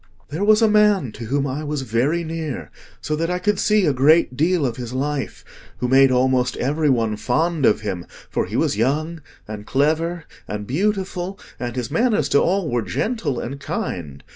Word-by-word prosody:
"There 160 +7 -3
was 215 +2 +5
a - - +6
man 210 - +3
to 115 - -8
whom 140 +4 0
I 140 +3 -3
was 150 -2 -3
very 130 +9 0
near, 155 - -5 0.3
so 155 - -2
that 165 +2 -1
I 180 - 0
could 200 +2 0
see 210 -2 +3
a 150 - +2
great 140 +1 +4
deal 160 +2 +2
of 120 -1 -2
his 125 -1 -6
life, 140 +1 -3 0.3
who 125 - -1
made 135 +1 +6
almost 125 0 +2
every 150 +4 +1
one 115 -4 +1
fond 155 +5 +1
of 105 - +2
him, 95 -5 -4 0.2
for - - -2
he - - -6
was - - +1
young, 155 +9 -1 0.3
and 105 0 -8
clever, 160 +4 0 0.2
and 105 0 -4
beautiful, 190 - -2 0.2
and 120 -1 -4
his 125 -3 -3
manners 235 -2 +1
to 140 - +4
all 190 -1 +1
were 120 -4 0
gentle 220 - -2
and 135 +4 -5
kind. 75 - -5
145 Hz, 190 wpm, -21 LUFS, 125-170 Hz, 0.3 s, a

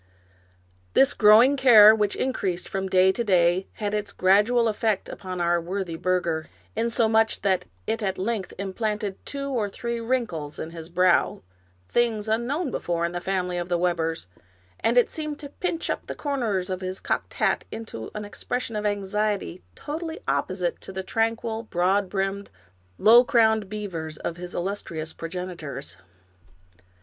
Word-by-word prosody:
This 270 - +5
growing 225 +6 +6
care, 220 -6 +8
which 210 -2 0
increased 195 -9 -2
from 195 0 -3
day 185 0 +5
to 235 - -2
day, 180 -2 +3
had 205 -1 -3
its 210 -1 -2
gradual 210 +6 +3
effect 215 -2 0
upon 185 -1 -6
our 170 0 +2
worthy 180 0 -4
burgher, 170 -2 -1 0.3
insomuch 225 -1 +2
that 185 -3 +1 0.2
it 225 +1 -1
at 190 -2 -1
length 200 0 -2
implanted 205 +1 -3
two 280 0 -4
or 230 -6 -1
three 235 +3 -4
wrinkles 225 - -2
in 160 - -6
his 165 -1 -9
brow, 180 - +2 0.4
things 225 -3 +1
unknown 250 +8 -1
before 170 -1 -1
in 170 - -2
the 175 0 -4
family 180 -1 -1
of 175 0 -5
the 175 - +2
Webbers, 165 - -1 0.5
and 235 +2 +1
it 245 - +4
seemed 305 -2 -4
to 290 -2 -9
pinch 340 +2 -3
up - - -3
the - - -5
corners 225 -10 -1
of 185 0 -3
his 185 0 -4
cocked - - -3
hat - - +1
into 165 - -7
an 210 0 -4
expression 230 +2 -4
of 210 0 0
anxiety 205 - -1
totally 320 +2 -5
opposite 175 +6 -1
to - - -8
the 190 0 -4
tranquil, 225 +2 -1
broad 190 -1 +1
brimmed, 195 +1 -2 0.5
low 235 +3 +7
crowned 220 -5 +3
beavers 170 -7 -5
of 170 - -4
his 180 0 -7
illustrious 170 -4 -4
progenitors. 165 - -6
200 Hz, 155 wpm, -25 LUFS, 180-225 Hz, 0.5 s, care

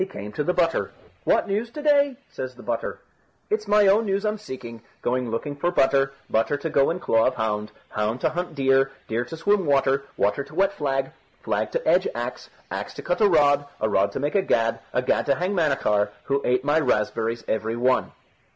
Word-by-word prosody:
He 185 - 0
came 105 - -8
to 150 - -2
the 180 - +1
butter. 170 -2 +1 0.4
"What - - +3
news 210 +4 -1
to 300 - -7
day?" 285 -3 +3
says 130 -1 -6
the - - -13
butter. 120 -1 -3 0.5
"It's 215 0 0
my 210 0 +5
own 205 +3 +4
news 200 +2 0
I'm 210 0 -1
seeking. 125 - -8 0.2
Going 125 0 0
looking 130 +6 -3
for 160 +5 0
butter, 135 -4 +3 0.2
butter 115 +6 +1
to 155 +2 -4
go 140 -2 +3
in 170 - -2
claw 115 -9 +3
of - - 0
hound, 105 -1 -2 0.2
hound 105 +3 -1
to - - +2
hunt 175 -1 -4
deer, 135 -1 +3 0.2
deer 115 +2 -1
to 165 - -8
swim 200 +4 +2
water, 140 -2 +2
water 105 +7 +1
to 155 - -14
wet 195 +2 +2
flag, 135 -4 -1 0.3
flag - - -1
to - - -2
edge - - +4
axe, - - -5 0.2
axe - - -5
to - - -8
cut 175 - -1
a 210 - +6
rod, 145 -3 +4
a 110 - +1
rod 100 -1 +2
to - - -3
make 145 +2 -1
a 200 - +3
gad, 115 -10 +1
a 125 - 0
gad - - +1
to 140 - +3
hang 180 +6 -1
Manachar, 135 - +1
who 140 0 0
ate 125 +1 +1
my 145 +2 +3
raspberries 115 -3 0
every 110 +1 -1
one." 125 +2 +1
140 Hz, 215 wpm, -24 LUFS, 115-180 Hz, 0.5 s, a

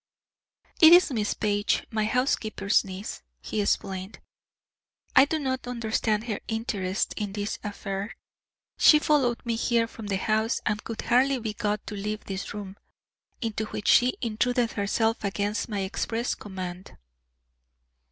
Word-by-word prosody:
"It 320 +1 +10
is 350 -3 +7
Miss 215 -4 -1
Page, 205 0 0
my 215 -1 0
housekeeper's 220 -3 +1
niece," 190 - -7 0.2
he 205 - -2
explained. 190 -1 -2 1.0
"I 265 - +8
do 315 +2 -1
not 260 -4 -3
understand 220 -3 0
her 220 -4 -3
interest 205 -4 -2
in 205 -2 -3
this 205 0 -3
affair. 200 0 -5 0.6
She 305 - +8
followed 275 -6 +1
me 235 -1 0
here 230 0 +2
from 225 -2 -9
the 195 -1 0
house 220 +3 +1
and 210 0 -1
could 230 -1 -5
hardly 260 +3 +3
be 220 -3 -4
got 210 -1 -2
to - - -6
leave 210 +1 -4
this 195 -1 -5
room, 200 -1 -7 0.7
into 220 -1 -2
which 210 - -3
she 250 +1 +5
intruded 235 +1 0
herself 220 +3 0
against 205 +3 -1
my 205 -2 -2
express 225 +4 -2
command." 185 -2 -7
215 Hz, 140 wpm, -27 LUFS, 205-235 Hz, 1.0 s, It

